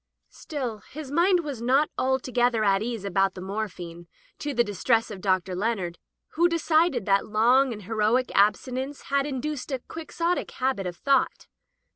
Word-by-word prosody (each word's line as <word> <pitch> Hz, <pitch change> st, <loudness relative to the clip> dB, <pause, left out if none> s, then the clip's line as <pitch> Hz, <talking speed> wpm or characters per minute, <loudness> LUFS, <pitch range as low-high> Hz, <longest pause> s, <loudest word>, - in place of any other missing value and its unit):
Still, 255 Hz, -8 st, -5 dB
his 285 Hz, +4 st, -9 dB
mind 350 Hz, +3 st, +3 dB
was 285 Hz, -7 st, -6 dB
not 270 Hz, +5 st, +2 dB
altogether 250 Hz, -3 st, +1 dB
at 195 Hz, -1 st, +3 dB
ease 225 Hz, -3 st, -3 dB
about 195 Hz, 0 st, +1 dB
the -, -, -7 dB
morphine, 180 Hz, -4 st, -5 dB, 0.3 s
to 295 Hz, -, -3 dB
the 240 Hz, -3 st, +3 dB
distress 225 Hz, +2 st, +1 dB
of 195 Hz, -3 st, -7 dB
Dr, 185 Hz, -1 st, +1 dB
Leonard, 185 Hz, -3 st, -2 dB, 0.3 s
who 340 Hz, +2 st, +2 dB
decided 320 Hz, -, +2 dB
that 195 Hz, -1 st, +2 dB
long 245 Hz, +5 st, +4 dB
and 210 Hz, -3 st, -7 dB
heroic 220 Hz, +5 st, +1 dB
abstinence 255 Hz, +7 st, +1 dB
had 280 Hz, 0 st, +2 dB
induced 285 Hz, +1 st, -4 dB
a 265 Hz, -, 0 dB
Quixotic 335 Hz, +2 st, -2 dB
habit 255 Hz, -8 st, -1 dB
of 175 Hz, -1 st, -6 dB
thought. 275 Hz, +6 st, +1 dB
240 Hz, 155 wpm, -26 LUFS, 200-275 Hz, 0.3 s, long